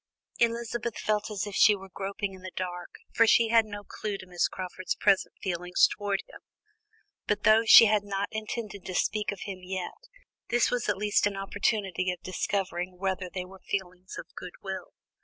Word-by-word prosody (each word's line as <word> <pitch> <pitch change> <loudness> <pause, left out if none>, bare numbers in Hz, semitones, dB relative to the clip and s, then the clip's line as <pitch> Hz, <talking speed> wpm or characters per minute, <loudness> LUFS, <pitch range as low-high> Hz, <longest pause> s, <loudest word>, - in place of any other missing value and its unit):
Elizabeth 235 0 0
felt 215 0 -1
as 210 -1 -3
if 205 - -7
she 210 +2 +6
were 195 -1 -10
groping 195 +1 -4
in 190 - -12
the 185 - -7
dark, 180 -1 -5 0.2
for 230 - +5
she 230 0 +5
had 225 -1 +4
no 205 -1 -7
clue 205 0 -5
to 185 - -11
Miss 180 -1 0
Crawford's 185 0 -4
present 195 -2 +2
feelings 180 -1 +3
towards 205 -1 -2
him; - - -13 0.9
but 205 0 0
though 220 +1 +5
she 230 - +10
had 210 -1 +3
not 200 0 -2
intended 215 -2 -5
to 185 - -4
speak 210 +3 0
of 200 - -8
him 195 -2 -6
yet, 185 - -6 0.4
this 240 0 +2
was 245 -4 -1
at 205 - +1
least 205 0 +2
an 200 -1 -4
opportunity 195 -2 -1
of 180 - -6
discovering 185 -1 -2
whether 190 -1 -2
they 185 -1 -4
were 190 +1 -13
feelings 185 -1 -5
of - - -6
goodwill. 190 +1 -7
200 Hz, 185 wpm, -28 LUFS, 185-215 Hz, 0.9 s, she